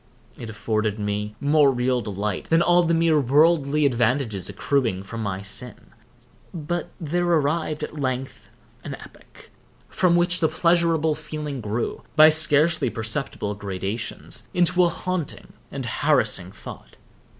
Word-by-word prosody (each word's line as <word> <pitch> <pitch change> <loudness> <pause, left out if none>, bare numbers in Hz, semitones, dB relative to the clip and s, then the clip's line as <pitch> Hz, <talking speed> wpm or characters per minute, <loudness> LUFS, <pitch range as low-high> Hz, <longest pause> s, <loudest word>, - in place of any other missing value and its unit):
It 115 - -8
afforded 110 0 -2
me 105 0 -3
more 145 0 +4
real 125 -1 0
delight 105 -2 -4
than 165 +1 +4
all 175 0 +4
the 170 -1 +1
mere 165 -2 +3
worldly 150 +2 +3
advantages 120 -6 0
accruing 105 -2 -1
from 115 +3 -7
my 100 -2 -3
sin. 100 +5 -7 0.6
But 170 +2 -3
there 175 +2 -1
arrived 155 -1 0
at 150 0 -6
length 130 -1 -4 0.3
an - - -6
epoch, - - -16 0.4
from 180 -2 +2
which 175 +1 +2
the 160 - +2
pleasurable 165 -2 +2
feeling 150 -3 -6
grew, 110 +2 -3
by 155 0 +8
scarcely 155 -2 +3
perceptible 110 -2 -3
gradations, 100 +2 -5
into 180 0 +3
a - - +2
haunting 185 -3 -5 0.2
and - - -5
harassing - - +1
thought. - - -12
140 Hz, 135 wpm, -23 LUFS, 110-165 Hz, 0.6 s, by